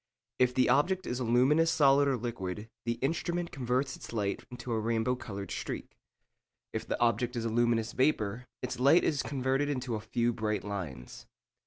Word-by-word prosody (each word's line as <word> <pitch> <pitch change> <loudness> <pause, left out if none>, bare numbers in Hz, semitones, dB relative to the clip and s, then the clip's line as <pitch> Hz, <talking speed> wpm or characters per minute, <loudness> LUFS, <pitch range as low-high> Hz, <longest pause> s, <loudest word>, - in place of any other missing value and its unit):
If 125 0 +3
the 130 - +4
object 185 +6 +2
is 125 - -2
a - - -1
luminous 130 +8 +4
solid 140 -2 +5
or 135 -2 +2
liquid, 105 -3 -5
the 115 - +1
instrument 170 +3 -1
converts 130 +1 -1
its - - -10
light 105 -3 -2
into 125 0 -7
a 110 - +1
rainbow 115 +2 +1
coloured 100 -6 -7
streak. - - -5 0.8
If - - -4
the - - -2
object 120 +1 +1
is 115 -1 -2
a - - 0
luminous 120 0 +1
vapour, 125 -4 0 0.2
its 125 0 -3
light 140 +7 +6
is 145 -4 +1
converted 135 +1 0
into 130 -4 -2
a 110 - -1
few 120 +2 0
bright 105 -1 -1
lines. 85 -12 -6
125 Hz, 180 wpm, -31 LUFS, 110-135 Hz, 0.8 s, light